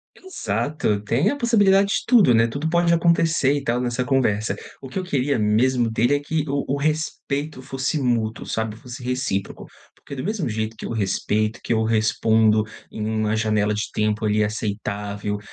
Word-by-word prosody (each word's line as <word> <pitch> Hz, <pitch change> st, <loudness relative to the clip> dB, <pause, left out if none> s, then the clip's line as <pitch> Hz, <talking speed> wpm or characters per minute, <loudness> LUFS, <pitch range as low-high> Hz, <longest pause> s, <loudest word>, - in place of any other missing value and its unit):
Exato, 120 Hz, -, -2 dB
tem 115 Hz, +7 st, +1 dB
a -, -, -1 dB
possibilidade 205 Hz, -6 st, +4 dB
de -, -, 0 dB
tudo, 220 Hz, -, +6 dB
né, 115 Hz, 0 st, +4 dB
tudo 140 Hz, +7 st, -3 dB
pode 170 Hz, 0 st, +2 dB
acontecer 165 Hz, -4 st, +3 dB
e 145 Hz, -1 st, -2 dB
tal 120 Hz, -2 st, 0 dB
nessa 125 Hz, 0 st, -1 dB
conversa. 120 Hz, -5 st, +1 dB, 0.3 s
O 135 Hz, -, -9 dB
que 130 Hz, -, -7 dB
eu 190 Hz, -, -1 dB
queria 140 Hz, -5 st, 0 dB
mesmo 115 Hz, +3 st, +2 dB
dele 120 Hz, +5 st, +2 dB
é -, -, 0 dB
que 155 Hz, +2 st, -2 dB
o 140 Hz, 0 st, -1 dB
o 140 Hz, -, 0 dB
respeito 150 Hz, -1 st, -2 dB
fosse 135 Hz, +3 st, -2 dB
mútuo, 115 Hz, -3 st, -1 dB
sabe, 110 Hz, -1 st, -3 dB
fosse 125 Hz, +1 st, -10 dB
recíproco, 125 Hz, -6 st, -3 dB, 0.3 s
porque 140 Hz, -, -10 dB
do 130 Hz, -, -5 dB
mesmo 205 Hz, -2 st, -2 dB
jeito 110 Hz, +1 st, -3 dB
que -, -, -7 dB
eu -, -, -5 dB
respeito, 110 Hz, 0 st, -1 dB
que -, -, -4 dB
eu 110 Hz, 0 st, +1 dB
respondo 110 Hz, 0 st, +3 dB, 0.3 s
em 105 Hz, -, -4 dB
uma 110 Hz, 0 st, 0 dB
janela 105 Hz, -1 st, +1 dB
de 105 Hz, +1 st, -3 dB
tempo, 105 Hz, +1 st, 0 dB
ali, 105 Hz, 0 st, +2 dB
aceitável, 105 Hz, -1 st, -3 dB
120 Hz, 180 wpm, -22 LUFS, 110-145 Hz, 0.3 s, tudo